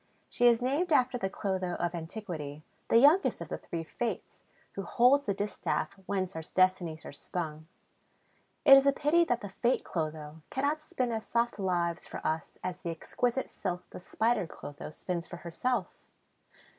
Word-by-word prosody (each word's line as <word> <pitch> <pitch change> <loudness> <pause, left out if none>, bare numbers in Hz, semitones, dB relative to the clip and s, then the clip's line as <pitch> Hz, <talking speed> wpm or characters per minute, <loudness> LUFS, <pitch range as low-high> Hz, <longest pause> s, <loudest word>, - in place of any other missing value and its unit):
She 245 - +3
is 240 0 +4
named 300 +8 +1
after 255 -3 +3
the 190 - -1
Clotho 190 -3 -2
of 175 0 -1
antiquity, 160 -4 -6 0.2
the - - +5
youngest 295 +10 +5
of - - -7
the - - -4
Three 165 -1 -5
Fates, 230 +7 -4 0.3
who 195 - -5
holds 250 +9 +4
the 200 - +1
distaff 205 0 -2
whence 190 -2 -1
our 160 - -3
destinies 175 -2 +1
are - - -7
spun. 155 +1 -5 1.0
It 275 -2 +11
is 275 +1 +6
a 280 - +5
pity 310 +5 +3
that 245 -5 0
the 205 - -6
Fate 240 +6 +1
Clotho 155 -1 -4
cannot 285 +3 0
spin 255 -5 -2
as 220 -1 -3
soft 235 -2 0
lives 175 -3 0
for - - -6
us 160 +1 -2
as 180 -1 -3
the 170 - -4
exquisite 240 +10 -1
silk 180 -2 -4
the - - -8
Spider 220 +1 0
Clotho 145 -1 -8
spins 170 +2 -4
for 175 - -8
herself! 185 +6 -1
195 Hz, 170 wpm, -30 LUFS, 170-245 Hz, 1.0 s, It